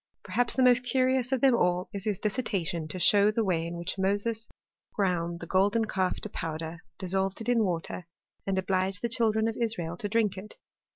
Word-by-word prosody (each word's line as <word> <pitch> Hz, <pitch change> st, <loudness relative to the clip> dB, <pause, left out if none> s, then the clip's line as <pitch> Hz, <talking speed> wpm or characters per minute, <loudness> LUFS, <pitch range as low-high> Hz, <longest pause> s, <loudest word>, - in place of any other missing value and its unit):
Perhaps 230 Hz, +5 st, 0 dB
th* 260 Hz, -, +4 dB
IBOBt 245 Hz, 0 st, +5 dB
curious 255 Hz, 0 st, +1 dB
of 265 Hz, -3 st, +1 dB
them 265 Hz, -3 st, +5 dB
all 180 Hz, -3 st, +1 dB
is 200 Hz, -1 st, -5 dB
his 210 Hz, -4 st, -1 dB
dissertation 195 Hz, -8 st, -2 dB
to 185 Hz, -, -6 dB
show 205 Hz, +3 st, +5 dB
tbi 220 Hz, 0 st, 0 dB
way 165 Hz, -4 st, 0 dB
in 170 Hz, 0 st, -5 dB
which 170 Hz, +3 st, -4 dB
Moses 205 Hz, +4 st, -1 dB, 0.5 s
ground 175 Hz, -4 st, -1 dB
the -, -, -5 dB
golden 200 Hz, +6 st, +2 dB
calf 190 Hz, -3 st, -1 dB
to 215 Hz, -, -4 dB
powderj 165 Hz, -1 st, -5 dB, 0.2 s
dissolved 190 Hz, +1 st, -2 dB
it 230 Hz, -, -4 dB
in 235 Hz, -2 st, +3 dB
water, 175 Hz, -1 st, -3 dB, 0.4 s
and 195 Hz, -1 st, 0 dB
obliged 190 Hz, +1 st, 0 dB
the 235 Hz, -, 0 dB
children 220 Hz, -2 st, +2 dB
of 225 Hz, -, -2 dB
Israel 180 Hz, -8 st, -1 dB
to 205 Hz, -, -4 dB
drink 210 Hz, -3 st, +1 dB
it. 210 Hz, +2 st, -10 dB
200 Hz, 195 wpm, -28 LUFS, 180-225 Hz, 0.5 s, IBOBt